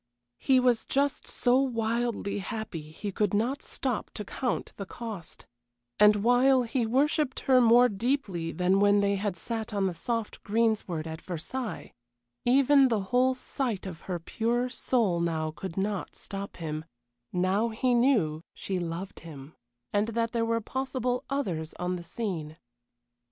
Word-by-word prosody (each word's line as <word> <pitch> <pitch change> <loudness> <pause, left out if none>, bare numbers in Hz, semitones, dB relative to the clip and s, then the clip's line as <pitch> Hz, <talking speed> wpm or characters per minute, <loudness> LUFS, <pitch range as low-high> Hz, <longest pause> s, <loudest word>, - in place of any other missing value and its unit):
He 260 -1 +4
was 245 -3 +3
just 280 +1 0
so 245 +1 +3
wildly 230 -4 -1
happy 220 -5 -5
he 200 +6 -5
could 205 0 0
not 250 +7 0
stop 255 -5 -3
to 210 - -5
count 250 +3 -2
the 200 - -6
cost; 215 -8 -8 0.5
and 210 0 +7
while 245 +4 +4
he 235 0 -1
worshipped 280 +3 +1
her 255 -2 +5
more 240 +1 +7
deeply 200 -7 -1
than 185 +2 +2
when 205 0 +5
they 200 0 +2
had 195 -2 -2
sat 225 +4 -4
on 200 -1 +1
the 185 - 0
soft 225 +6 -3
greensward 210 -7 0
at 160 0 -6
Versailles, 215 +8 -5 0.5
even 275 +2 +6
the 225 -5 +1
whole 255 +1 +4
sight 250 -5 -3
of 175 -4 -7
her 180 - 0
pure 235 +8 -1
soul 230 -8 +1
now 160 -2 -1
could 175 +2 -7
not 200 0 -2
stop 200 0 -7
him 155 -2 -4 0.5
now 190 +5 +1
he 245 +3 +1
knew 225 - +3
she 190 -2 -3
loved 175 +3 -5
him, 150 -3 -11 0.4
and 205 +1 +2
that 230 0 -1
there 230 -1 0
were 230 0 0
possible 255 0 -2
others 180 - -2
on 180 +1 -2
the 175 - -5
scene. 170 -4 -4
220 Hz, 155 wpm, -28 LUFS, 185-245 Hz, 0.5 s, and